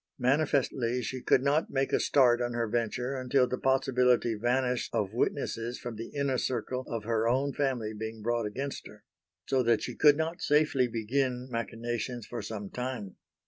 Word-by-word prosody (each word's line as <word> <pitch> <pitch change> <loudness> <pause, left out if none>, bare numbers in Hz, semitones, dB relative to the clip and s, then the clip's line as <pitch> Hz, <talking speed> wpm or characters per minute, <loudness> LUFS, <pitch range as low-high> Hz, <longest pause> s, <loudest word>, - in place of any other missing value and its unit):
Manifestly 130 -2 +1
she 130 +3 -4
could 130 - +3
not 145 +3 +2
make 135 0 -1
a - - +4
start 125 -3 +4
on 120 0 -1
her 120 -1 -1
venture 120 +3 -1
until 130 0 +2
the 125 0 -3
possibility 125 -3 +2
vanished 125 +3 0
of 100 -1 -1
witnesses 120 -1 -1
from 120 -2 -6
the 115 +2 -6
inner 140 -3 -1
circle 125 +1 -2
of 115 -2 -3
her 115 0 0
own 135 +3 +1
family 125 -6 -1
being 110 0 -6
brought 120 -1 0
against 135 +6 -5
her; - - -15 0.4
so 135 -1 +2
that 115 -2 +2
she - - -4
could 145 -1 +5
not 160 +2 -2
safely 150 -4 +3
begin 125 +2 -1
machinations 115 0 -3
for 120 - -5
some 105 -3 -6
time. 125 -6 -5
125 Hz, 175 wpm, -29 LUFS, 115-135 Hz, 0.4 s, could